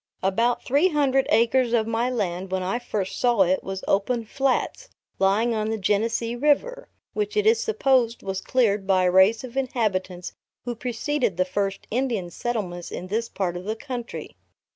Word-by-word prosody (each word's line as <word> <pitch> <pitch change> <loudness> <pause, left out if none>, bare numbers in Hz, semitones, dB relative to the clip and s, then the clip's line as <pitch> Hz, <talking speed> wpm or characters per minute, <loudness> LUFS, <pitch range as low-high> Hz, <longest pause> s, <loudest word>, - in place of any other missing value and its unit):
About 230 +6 +1
three 285 +8 +3
hundred 275 -5 +2
acres 235 +2 +3
of 225 -2 +3
my 230 +2 0
land, 190 -6 -2
when 190 -1 -1
I 195 +6 -1
first 210 -6 -3
saw 240 -5 +4
it, 185 +1 +1
was 195 0 -5
open 225 +4 +1
flats, 275 - -1 0.3
lying 210 +5 +2
on 215 -1 -1
the 220 - -1
Genesee 225 +3 0
River, 300 - +1 0.2
which 425 0 -2
it 420 - +2
is 450 +1 +5
supposed 265 - +1
was 190 -1 -3
cleared 210 -6 +1
by 190 -1 +3
a 180 - +3
race 190 +6 +5
of 255 -1 -9
inhabitants 195 -9 -2 0.3
who 245 - -2
preceded 245 -2 -2
the 185 - +2
first 195 +1 -2
Indian 230 -7 -1
settlements 185 -6 -4
in 185 - -7
this 230 +3 -1
part 180 -3 -2
of 175 +1 -6
the 215 +1 -2
country. 245 -1 -7
230 Hz, 175 wpm, -24 LUFS, 195-255 Hz, 0.3 s, is